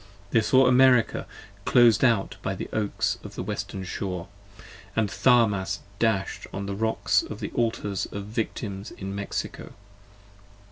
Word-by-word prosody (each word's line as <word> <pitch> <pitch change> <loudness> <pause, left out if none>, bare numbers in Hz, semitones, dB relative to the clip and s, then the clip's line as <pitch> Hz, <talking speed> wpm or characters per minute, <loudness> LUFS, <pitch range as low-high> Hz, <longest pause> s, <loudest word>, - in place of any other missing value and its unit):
48 - - -25
They 115 - +4
saw 130 +4 +5
America 125 -1 +4 0.4
clos'd 120 -1 +5
out 115 -6 +2
by 95 - -2
the - - -5
Oaks 105 -2 -1
of - - -9
the - - -4
western 100 -1 -4
shore: 90 -1 -4 0.7
And 110 -3 +1
Tharmas 105 -6 +3 0.2
dash'd 110 -4 0
on 100 +1 -4
the 100 - -3
Rocks 110 +2 +1
of - - -8
the - - -4
Altars 110 -4 -1
of 100 -1 -6
Victims 105 -2 -4
in 95 0 -7
Mexico. 100 0 -5
105 Hz, 145 wpm, -26 LUFS, 100-115 Hz, 0.7 s, saw